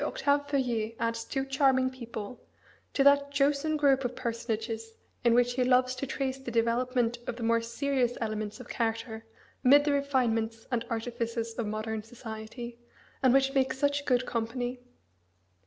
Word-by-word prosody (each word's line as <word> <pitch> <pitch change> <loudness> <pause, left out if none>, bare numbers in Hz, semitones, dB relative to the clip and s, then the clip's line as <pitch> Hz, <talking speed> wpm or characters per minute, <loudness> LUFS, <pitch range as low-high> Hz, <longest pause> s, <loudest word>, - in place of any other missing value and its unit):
Octave 285 -1 +1
Feuillet 235 -5 0
adds 230 0 -1
two 270 +3 -2
charming 265 -1 +3
people 235 -2 -7 0.5
to 275 - +2
that 280 0 +5
chosen 285 +2 +1
group 275 -2 +3
of 245 0 -2
personages 225 -1 -3 0.3
in 235 -1 +5
which 245 0 +3
he 250 0 +1
loves 255 0 +3
to 255 +2 -4
trace 265 0 -2
the 265 - -6
development 240 +1 +1
of 235 - -2
the 235 - -6
more 230 0 +3
serious 245 +1 0
elements 215 0 -3
of 250 - -10
character 225 -1 -3 0.4
amid 285 +3 +7
the 295 - +2
refinements 235 -6 0
and 235 -2 0
artifices 230 0 -3
of 230 -2 -3
modern 215 +1 -3
society, 230 +1 -8 0.4
and 260 - +5
which 270 +1 +3
make 265 -1 +2
such 285 +1 0
good 250 -1 +2
company. 245 +2 -2
245 Hz, 155 wpm, -29 LUFS, 230-270 Hz, 0.5 s, amid